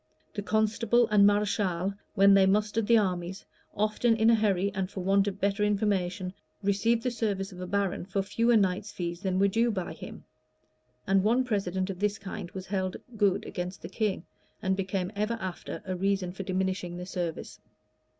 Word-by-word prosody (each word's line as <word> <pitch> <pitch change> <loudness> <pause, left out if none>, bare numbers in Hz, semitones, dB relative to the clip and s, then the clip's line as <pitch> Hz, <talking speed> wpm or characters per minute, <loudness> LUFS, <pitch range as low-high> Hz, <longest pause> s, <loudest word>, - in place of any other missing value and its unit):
The 205 - -3
constable 220 +3 +2
and 200 -1 +7
mareschal, 200 -3 +1 0.2
when 195 +1 +6
they 195 -1 +6
mustered 210 +2 +1
the 235 - +6
armies, 185 -2 -1 0.3
often 215 +3 +2
in 220 +1 +4
a - - +6
hurry, 200 -3 +1
and 190 -2 -2
for 195 - -6
want 195 +1 +3
of 195 -1 -3
better 200 +1 +1
information, 195 -3 0 0.3
received 225 +4 +2
the 250 - 0
service 205 -4 -2
of 180 0 -9
a 180 - -5
baron 195 -1 -1
for 195 0 -1
fewer 230 +4 +3
knights' 195 +1 0
fees 170 -1 -4
than 190 -1 -1
were 200 +1 +4
due 230 +4 +2
by 190 -5 -3
him; - - -10 0.8
and 195 0 +3
one 235 +6 +3
precedent 195 -5 -1
of 180 - -9
this 205 0 0
kind 200 -2 -7
was 185 0 -7
held 190 -2 -2 0.2
good 205 -3 +2
against 180 +1 -5
the 170 - -6
king, 195 -3 -1 0.3
and 190 -2 0
became 190 -1 -2
ever 210 +3 -1
after 185 -3 -6
a 185 -1 -2
reason 195 -1 0
for 190 - -7
diminishing 185 -2 -2
the 180 - -6
service. 175 -3 -4
195 Hz, 185 wpm, -28 LUFS, 185-210 Hz, 0.8 s, and